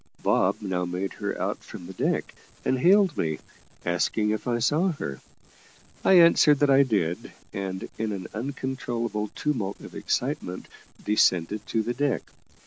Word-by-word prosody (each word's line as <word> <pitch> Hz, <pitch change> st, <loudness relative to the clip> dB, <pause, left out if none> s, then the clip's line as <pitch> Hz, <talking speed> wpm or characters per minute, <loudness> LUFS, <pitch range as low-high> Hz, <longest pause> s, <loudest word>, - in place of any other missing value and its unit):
Bob -, -, +3 dB
now 95 Hz, -2 st, -1 dB
made 90 Hz, +2 st, -3 dB
her -, -, -4 dB
out -, -, -2 dB
from 85 Hz, -, -10 dB
the 95 Hz, -, -8 dB
deck, -, -, -1 dB, 0.3 s
and 130 Hz, -, +1 dB
hailed 190 Hz, +2 st, +5 dB
me, 80 Hz, -2 st, -1 dB, 0.5 s
asking 105 Hz, +5 st, +1 dB
if 110 Hz, +3 st, -3 dB
I 120 Hz, -1 st, +1 dB
saw 155 Hz, +10 st, +2 dB
her. 70 Hz, -, -6 dB, 0.8 s
I -, -, +5 dB
answered 170 Hz, -4 st, +7 dB
that 145 Hz, 0 st, +3 dB
I 135 Hz, +1 st, +7 dB
did, 100 Hz, -10 st, 0 dB, 0.2 s
and, 95 Hz, -1 st, -4 dB
in 110 Hz, -1 st, -1 dB
an 95 Hz, -3 st, -4 dB
uncontrollable 120 Hz, -3 st, -3 dB
tumult 115 Hz, -10 st, -2 dB
of -, -, -11 dB
excitement, 90 Hz, +1 st, -2 dB, 0.4 s
descended 105 Hz, -1 st, +2 dB
to 110 Hz, -, 0 dB
the 120 Hz, -, -2 dB
deck. 140 Hz, 0 st, 0 dB
110 Hz, 150 wpm, -26 LUFS, 95-140 Hz, 0.8 s, answered